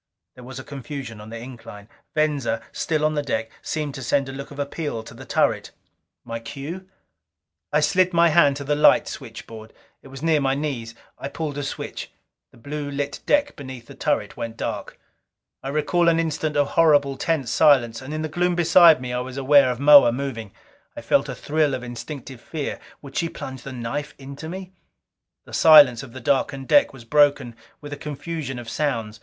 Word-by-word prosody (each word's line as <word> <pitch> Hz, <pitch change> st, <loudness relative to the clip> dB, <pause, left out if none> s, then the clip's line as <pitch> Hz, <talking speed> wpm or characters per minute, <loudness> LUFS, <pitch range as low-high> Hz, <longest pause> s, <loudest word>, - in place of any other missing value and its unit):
There 125 Hz, -, -13 dB
was 130 Hz, +1 st, -9 dB
a -, -, -8 dB
confusion 135 Hz, -5 st, -7 dB
on 105 Hz, -, -11 dB
the 115 Hz, -, -7 dB
incline. 115 Hz, -4 st, -10 dB, 0.3 s
Venza, 145 Hz, -7 st, 0 dB
still 155 Hz, -2 st, -1 dB
on 155 Hz, -, +1 dB
the 150 Hz, -, 0 dB
deck, 115 Hz, -5 st, -3 dB
seemed 150 Hz, -3 st, -3 dB
to 135 Hz, -, -7 dB
send 135 Hz, +3 st, 0 dB
a -, -, -6 dB
look 140 Hz, +1 st, -7 dB
of 145 Hz, -, -12 dB
appeal 145 Hz, -4 st, -4 dB
to -, -, -12 dB
the -, -, -11 dB
turret. -, -, +1 dB, 0.6 s
My 115 Hz, -1 st, -5 dB
cue? 150 Hz, +11 st, -8 dB, 0.8 s
I -, -, +3 dB
slid 185 Hz, -1 st, +3 dB
my 170 Hz, -1 st, +4 dB
hand 150 Hz, -3 st, +4 dB
to 140 Hz, -, -5 dB
the 145 Hz, +1 st, 0 dB
light 150 Hz, 0 st, +5 dB
switchboard. 115 Hz, -3 st, -9 dB, 0.3 s
It -, -, -15 dB
was 135 Hz, +2 st, -10 dB
near 160 Hz, -2 st, +3 dB
my 135 Hz, 0 st, +1 dB
knees. 130 Hz, -6 st, -4 dB, 0.2 s
I -, -, -4 dB
pulled 150 Hz, 0 st, -4 dB
a -, -, -2 dB
switch. 140 Hz, -, -6 dB, 0.4 s
The -, -, -21 dB
blue 145 Hz, +4 st, -5 dB
lit 140 Hz, 0 st, -3 dB
deck 290 Hz, 0 st, +2 dB
beneath 130 Hz, -4 st, -9 dB
the -, -, -12 dB
turret -, -, -1 dB
went 115 Hz, -1 st, -6 dB
dark. -, -, -5 dB, 0.6 s
I 135 Hz, -, -5 dB
recall 170 Hz, +4 st, +2 dB
an 165 Hz, 0 st, +2 dB
instant 155 Hz, -2 st, -1 dB
of 145 Hz, -1 st, +2 dB
horrible, 145 Hz, -4 st, +4 dB
tense 135 Hz, -4 st, -1 dB
silence, 120 Hz, -6 st, +4 dB
and 130 Hz, +2 st, -8 dB
in 155 Hz, 0 st, -3 dB
the -, -, -1 dB
gloom 175 Hz, +3 st, 0 dB
beside 170 Hz, -3 st, +6 dB
me 125 Hz, -1 st, -4 dB
I 125 Hz, -, -1 dB
was 130 Hz, +1 st, -6 dB
aware 140 Hz, 0 st, +5 dB
of 125 Hz, -1 st, -3 dB
Moa 140 Hz, -4 st, +8 dB
moving. 120 Hz, -5 st, -5 dB, 0.5 s
I -, -, -5 dB
felt -, -, +1 dB
a -, -, -4 dB
thrill 150 Hz, -2 st, 0 dB
of 125 Hz, -, -7 dB
instinctive 120 Hz, +1 st, -8 dB
fear 155 Hz, -3 st, -5 dB, 0.2 s
would 135 Hz, -1 st, -11 dB
she 165 Hz, -, 0 dB
plunge 130 Hz, -4 st, -8 dB
that 135 Hz, -, -8 dB
knife 140 Hz, +5 st, -5 dB
into 140 Hz, +3 st, -9 dB
me? 185 Hz, +1 st, -7 dB, 0.7 s
The -, -, -14 dB
silence 145 Hz, -6 st, +7 dB
of 135 Hz, -3 st, -11 dB
the 130 Hz, -, -8 dB
darkened 135 Hz, +1 st, 0 dB
deck 290 Hz, -, +5 dB
was 130 Hz, -4 st, -13 dB
broken 140 Hz, -2 st, +3 dB, 0.3 s
with 145 Hz, -1 st, -8 dB
a -, -, -6 dB
confusion 150 Hz, -2 st, -5 dB
of 120 Hz, -1 st, -8 dB
sounds. 115 Hz, -6 st, -2 dB
140 Hz, 200 wpm, -23 LUFS, 125-155 Hz, 0.8 s, Moa